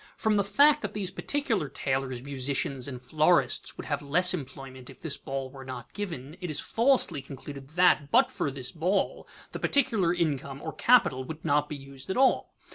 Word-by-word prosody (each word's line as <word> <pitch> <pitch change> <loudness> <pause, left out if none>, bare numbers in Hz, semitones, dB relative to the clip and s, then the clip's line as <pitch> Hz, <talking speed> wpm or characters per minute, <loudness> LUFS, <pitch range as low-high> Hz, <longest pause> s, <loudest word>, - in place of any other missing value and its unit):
From 220 -1 +1
the 200 - +3
fact 285 +9 +4
that - - -5
these 195 -3 -2
particular 225 - -1
tailors, 130 -2 -2
musicians, 135 -1 -2
and 130 -3 -6
florists 145 0 +1
would - - -7
have 145 -1 -2
less 180 +6 +5
employment 130 -2 -7
if - - -13
this 155 -4 -3
ball 135 -1 -5
were 135 -1 -10
not 130 -3 -8
given, 165 -8 -6
it 180 - -4
is 155 - 0
falsely 235 - +2
concluded 135 0 -10
that, 175 -5 +4
but - - +4
for - - -2
this 130 -2 -4
ball, 180 +5 -1 0.2
this - - -7
particular 230 -11 +2
income, 140 -6 -2
or 160 - -6
capital, 220 - +3
would 160 +3 -8
not 150 +1 +2
be 150 - -4
used 135 +1 -12
at 190 - -2
all. 265 0 +2
145 Hz, 190 wpm, -28 LUFS, 135-185 Hz, 0.2 s, less